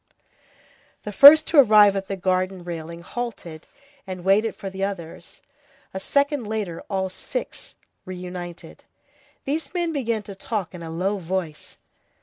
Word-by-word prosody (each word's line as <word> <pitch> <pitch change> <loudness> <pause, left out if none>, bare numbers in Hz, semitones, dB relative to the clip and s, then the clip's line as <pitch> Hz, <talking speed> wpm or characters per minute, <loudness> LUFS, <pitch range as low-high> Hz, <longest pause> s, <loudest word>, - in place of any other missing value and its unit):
The 210 - -5
first 290 +8 +9
to 315 - +4
arrive 210 -5 +7
at 195 0 -3
the 195 - -4
garden 185 0 -1
railing 170 0 -7
halted, 180 -8 -7 0.4
and 185 -2 -7
waited 205 +4 +2
for 200 - -8
the 190 0 -5
others; 185 -5 -6 0.5
a 190 - -4
second 280 +3 0
later, 210 -6 -4
all 190 -2 -1
six 345 - -6 0.3
were - - -14
reunited. 180 -1 -9 0.6
These 290 +2 -3
men 345 -2 0
began 230 -6 -2
to 200 - -9
talk 195 -1 -4
in 175 - -9
a 165 - -7
low 190 +5 -2
voice. 175 -3 -5
195 Hz, 145 wpm, -23 LUFS, 180-225 Hz, 0.6 s, first